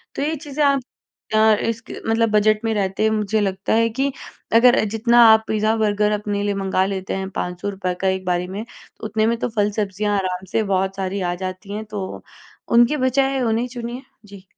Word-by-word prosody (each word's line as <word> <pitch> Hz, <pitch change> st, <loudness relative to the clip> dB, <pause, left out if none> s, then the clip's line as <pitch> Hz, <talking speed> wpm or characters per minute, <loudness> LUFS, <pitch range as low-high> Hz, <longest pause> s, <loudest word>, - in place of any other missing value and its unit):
तो -, -, -3 dB
ये 310 Hz, +2 st, 0 dB
चीज़ें 295 Hz, 0 st, -3 dB
आप 275 Hz, -1 st, +3 dB, 0.5 s
अ, 215 Hz, 0 st, +5 dB
इसक 230 Hz, 0 st, -3 dB, 0.2 s
मतलब 225 Hz, 0 st, +2 dB
बजट 215 Hz, +1 st, +3 dB
में 225 Hz, -, +1 dB
रहते 195 Hz, +1 st, 0 dB
हुए, 220 Hz, 0 st, +1 dB
मुझे 210 Hz, +1 st, 0 dB
लगता 195 Hz, 0 st, -1 dB
है 230 Hz, +1 st, +3 dB
कि 275 Hz, +1 st, +1 dB, 0.4 s
अगर 245 Hz, +1 st, +7 dB
अ, -, -, +2 dB
जितना 235 Hz, +2 st, +3 dB
आप 220 Hz, 0 st, +6 dB
पिज़्ज़ा-बर्गर 215 Hz, -1 st, +1 dB
अपने 205 Hz, -1 st, -2 dB
लिए 205 Hz, 0 st, 0 dB
मँगा 190 Hz, -1 st, 0 dB
लेते 190 Hz, -1 st, -3 dB
हैं, 190 Hz, 0 st, -4 dB
₹500 185 Hz, +1 st, -3 dB
का 190 Hz, -, +1 dB
एक 190 Hz, 0 st, -1 dB
बारी 180 Hz, 0 st, 0 dB
में, 205 Hz, +4 st, -6 dB, 0.4 s
उतने 215 Hz, 0 st, 0 dB
में 235 Hz, 0 st, +1 dB
तो -, -, -1 dB
फल-सब्ज़ियाँ 205 Hz, 0 st, 0 dB
आराम 185 Hz, -1 st, -3 dB
से 220 Hz, -, +1 dB
बहुत 190 Hz, +1 st, 0 dB
सारी 190 Hz, +1 st, -3 dB
आ -, -, -5 dB
जाती 185 Hz, +2 st, -7 dB
हैं। 215 Hz, +1 st, -5 dB
तो 205 Hz, -3 st, -6 dB, 0.5 s
उनके 240 Hz, +6 st, +5 dB
बजाय, 270 Hz, +1 st, +1 dB
उन्हें 230 Hz, +1 st, 0 dB
चुनिए। 245 Hz, +1 st, -6 dB, 0.2 s
जी। 200 Hz, -2 st, -13 dB
210 Hz, 195 wpm, -21 LUFS, 195-230 Hz, 0.5 s, अगर